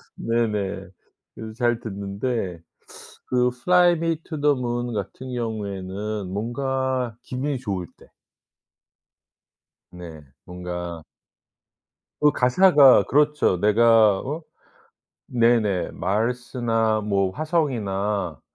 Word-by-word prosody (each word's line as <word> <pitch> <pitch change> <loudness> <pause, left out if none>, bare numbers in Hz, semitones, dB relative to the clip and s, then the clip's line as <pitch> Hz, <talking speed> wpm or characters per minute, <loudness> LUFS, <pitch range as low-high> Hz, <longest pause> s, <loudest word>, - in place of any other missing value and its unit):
네네. 105 -4 -1 0.5
그래서 110 -1 -8
잘 120 -2 +1
듣는데 100 -2 -4 0.7
그 125 0 +2
플라이투더문 150 -5 +1
같은 115 +6 -6
경우에는 105 -3 -4
뭔가 130 +2 -2
기분이 135 +2 -3
좋을 95 -7 -4
때. - - -19 1.8
네. 85 -3 -10 0.2
뭔가 90 -2 -6 1.2
그 150 0 +5
가사가 140 +1 +6
그렇죠. 150 -9 +2
내가 110 -1 +4
어 155 +5 -5 0.8
네네 115 -6 +2
Mars나 115 0 0
뭐 100 -2 0
"화성이나 105 - -1
115 Hz, 180 characters per minute, -23 LUFS, 100-130 Hz, 1.8 s, 가사가